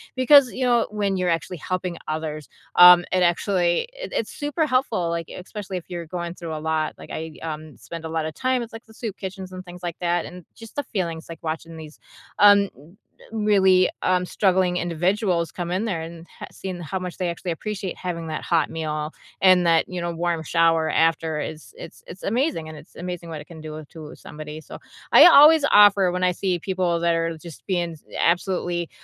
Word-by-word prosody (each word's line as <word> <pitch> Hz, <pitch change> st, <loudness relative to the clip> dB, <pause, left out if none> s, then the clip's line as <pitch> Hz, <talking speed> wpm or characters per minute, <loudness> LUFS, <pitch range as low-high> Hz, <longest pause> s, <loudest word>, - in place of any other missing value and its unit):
because, 260 Hz, 0 st, +6 dB
you 260 Hz, -, -2 dB
know, 240 Hz, -2 st, +3 dB
when 205 Hz, -2 st, -1 dB
you're 185 Hz, -1 st, 0 dB
actually 165 Hz, +2 st, -2 dB
helping 180 Hz, +1 st, -4 dB
others, 155 Hz, -1 st, -4 dB, 0.3 s
um, 180 Hz, 0 st, +9 dB
it 185 Hz, -, +2 dB
actually 175 Hz, -, +1 dB
it -, -, -8 dB
it's 220 Hz, -, -2 dB
super 295 Hz, +2 st, 0 dB
helpful, 255 Hz, -, 0 dB
like, 165 Hz, -1 st, -3 dB
especially 190 Hz, 0 st, -7 dB
if 175 Hz, -, -8 dB
you're 170 Hz, -2 st, -5 dB
going 170 Hz, 0 st, -5 dB
through 170 Hz, -3 st, -7 dB
a 155 Hz, -, -4 dB
lot. 155 Hz, 0 st, -1 dB
Like, -, -, -12 dB
I, 160 Hz, 0 st, -5 dB
um, 155 Hz, -1 st, -6 dB
spend 165 Hz, -1 st, -9 dB
a -, -, -4 dB
lot 160 Hz, -1 st, -2 dB
of 155 Hz, -, -5 dB
time 255 Hz, +3 st, 0 dB
with, 235 Hz, -, -7 dB
like, 225 Hz, -, -10 dB
the 220 Hz, -, -18 dB
soup 220 Hz, -3 st, -6 dB
kitchens 190 Hz, -1 st, -7 dB
and 185 Hz, 0 st, -8 dB
things 180 Hz, 0 st, -12 dB
like 170 Hz, -2 st, -4 dB
that, 175 Hz, -1 st, 0 dB
and 180 Hz, -1 st, -11 dB
just 225 Hz, -1 st, -13 dB
the 290 Hz, -, 0 dB
feelings, 170 Hz, -9 st, -4 dB
like, 165 Hz, -1 st, -8 dB
watching 165 Hz, +1 st, -5 dB
these, 155 Hz, -1 st, -11 dB, 0.4 s
um, 200 Hz, -1 st, +6 dB
r 145 Hz, +3 st, -17 dB, 0.5 s
really, 195 Hz, -4 st, +4 dB
um, 180 Hz, 0 st, +1 dB
struggling 185 Hz, -1 st, +1 dB
individuals 175 Hz, +1 st, 0 dB
come 175 Hz, -1 st, -5 dB
in 185 Hz, +4 st, 0 dB
there 195 Hz, -7 st, -2 dB
and 165 Hz, 0 st, -9 dB, 0.2 s
h -, -, -6 dB
seeing 185 Hz, -2 st, -6 dB
how 175 Hz, +3 st, -4 dB
much 180 Hz, -1 st, -6 dB
they 180 Hz, -2 st, -1 dB
actually 170 Hz, +1 st, -4 dB
appreciate 195 Hz, +2 st, -5 dB
having 170 Hz, -2 st, -5 dB
that 155 Hz, -, -4 dB
hot 165 Hz, -2 st, +1 dB
meal 155 Hz, -1 st, -3 dB, 0.3 s
and 185 Hz, -2 st, +5 dB
that, 165 Hz, -1 st, +4 dB
you 180 Hz, -1 st, -4 dB
know, 170 Hz, 0 st, -2 dB
warm 170 Hz, -1 st, -1 dB
shower 165 Hz, 0 st, +2 dB
after 160 Hz, -1 st, +1 dB
is 155 Hz, +1 st, -8 dB
it's 165 Hz, -, -11 dB
it's 180 Hz, -, -11 dB
amazing, 230 Hz, -, -1 dB
and 155 Hz, -, -9 dB
it's -, -, -16 dB
amazing 180 Hz, -1 st, -6 dB
what 155 Hz, -2 st, -6 dB
it -, -, -12 dB
can 165 Hz, -2 st, -12 dB
do 155 Hz, 0 st, -8 dB
to 155 Hz, -2 st, -10 dB
somebody, 150 Hz, +1 st, -9 dB
so -, -, -10 dB, 0.3 s
I -, -, +9 dB
always 310 Hz, -2 st, +8 dB
offer 200 Hz, -3 st, +6 dB
when 180 Hz, 0 st, -2 dB
I 180 Hz, -, +3 dB
see 180 Hz, 0 st, -1 dB
people 180 Hz, -2 st, -1 dB
that 170 Hz, 0 st, +2 dB
are 165 Hz, 0 st, -1 dB
just 165 Hz, -1 st, -12 dB
being 175 Hz, -3 st, -1 dB, 0.2 s
absolutely, 175 Hz, -1 st, 0 dB
175 Hz, 210 wpm, -23 LUFS, 165-190 Hz, 0.5 s, um